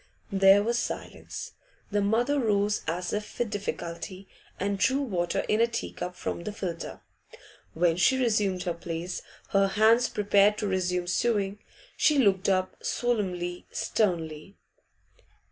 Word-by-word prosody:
There 195 +1 +6
was 235 +2 +1
silence. - - -5 0.4
The 205 0 +2
mother 240 +8 +2
rose 210 -3 +1
as 175 +3 -2
if 210 0 -4
with 240 -3 -1
difficulty, 190 -1 -5 0.3
and 200 +1 -1
drew 260 +7 +3
water 175 -8 -1
in 215 +1 +1
a 235 - +5
tea 235 - -4
cup 180 0 -6
from 170 - -4
the 210 - -4
filter. 175 -5 -5 0.7
When 165 0 +2
she 260 +8 +4
resumed 210 -7 +1
her 175 - -1
place, 170 +1 -5 0.3
her 195 0 +3
hands 220 +4 +4
prepared 205 0 +3
to 210 - -2
resume 180 -2 0
sewing. 200 +1 0 0.4
She 300 - +4
looked 200 -6 +3
up, 185 -1 0
solemnly, 180 -7 -1
sternly. 170 -3 -1
195 Hz, 140 wpm, -28 LUFS, 180-215 Hz, 0.7 s, There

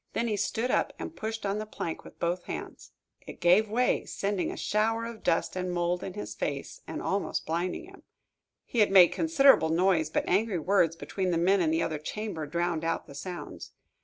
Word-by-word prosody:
Then 235 - 0
he 215 - 0
stood 220 +5 -1
up - - +1
and 325 - -7
pushed 220 0 -4
on 200 +1 -1
the 215 - -5
plank 170 -6 -5
with - - -14
both 175 +1 -1
hands. - - -7 0.4
It - - -9
gave 185 +5 +4
way, 245 +4 +1
sending 200 -2 -2
down - - -4
a - - -11
shower 225 +2 0
of 230 -1 -8
dust 165 - 0
and 185 -1 -2
mold 175 0 0
in 190 - -6
his 105 0 -5
face, - - -4
and - - -5
almost - - -1
blinding 170 - -2
him. 385 +1 -15 0.6
He 240 - -2
had 210 - +5
made 185 -3 +8
considerable 280 - +4
noise, 165 -1 +2
but - - -1
angry 200 +1 +2
words 165 -1 +2
between 185 +2 -3
the 170 - +1
men 185 +3 +3
in 165 - +2
the 160 +1 +1
other 160 -2 -2
chamber 165 -1 -4
drowned 170 +1 -1
out 165 0 -1
the - - -12
sounds. 175 +5 -7
185 Hz, 210 wpm, -29 LUFS, 170-215 Hz, 0.6 s, made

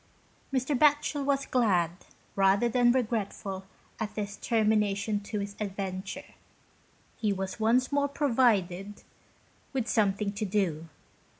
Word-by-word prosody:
Mr. 265 +2 0
Batchel 290 +1 +3
was 275 0 +1
glad, 190 -10 +2 0.4
rather 195 +4 +4
than 240 +1 +4
regretful 210 -5 -2 0.3
at 215 -2 -4
this 205 -1 -3
termination 210 -2 +1
to 205 +1 -5
his 200 0 -6
adventure. 195 +5 -5 0.8
He 215 -2 0
was 190 +2 -4
once 240 +5 +2
more 285 0 +2
provided 210 - +1 0.7
with 255 -4 -1
something 205 -2 +1
to 210 +1 -4
do. 180 -6 -1
210 Hz, 115 wpm, -29 LUFS, 195-250 Hz, 0.8 s, rather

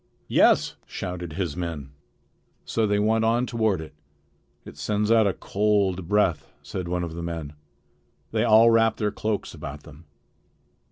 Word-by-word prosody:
"Yes," - - +4
shouted 90 -3 -5
his 85 -4 -3
men. 80 -6 -5 0.7
So 110 -1 0
they 105 0 +1
went 110 +2 +2
on 115 +2 +2
toward 110 -7 0
it. 80 - -10 0.7
"It - - -11
sends 105 +9 -1
out 110 -2 +5
a 95 - +1
cold 100 -3 0
breath," 95 -6 +1
said 90 -2 -5
one 90 0 -1
of 85 -2 -5
the 85 - -6
men. 80 -3 -5 0.8
They 110 -1 +1
all 115 0 +6
wrapped 115 -1 +3
their 105 -2 0
cloaks 105 0 -3
about 75 +1 -8
them. 75 +2 -15
100 Hz, 155 wpm, -25 LUFS, 85-110 Hz, 0.8 s, all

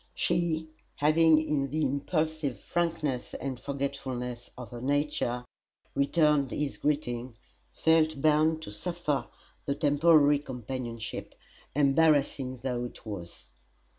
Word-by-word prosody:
She, 170 -2 0 0.3
having 155 +1 +5
in 140 -2 0
the 155 +3 -1
impulsive 150 0 -1
frankness 165 -7 -2
and 130 -2 -4
forgetfulness 130 -3 -4
of 125 -1 -8
her 120 -1 -7
nature 140 -3 0 0.5
returned 145 -1 +3
his 145 +3 -3
greeting, 125 -5 -1 0.4
felt 160 -2 +3
bound 155 +2 +3
to - - -7
suffer 150 +5 -2 0.4
the 140 - +1
temporary 145 0 +5
companionship, 125 -4 -6 0.4
embarrassing 140 -3 +2
though 125 -2 -1
it 120 - -10
was. 90 -6 -8
140 Hz, 105 wpm, -29 LUFS, 125-155 Hz, 0.5 s, having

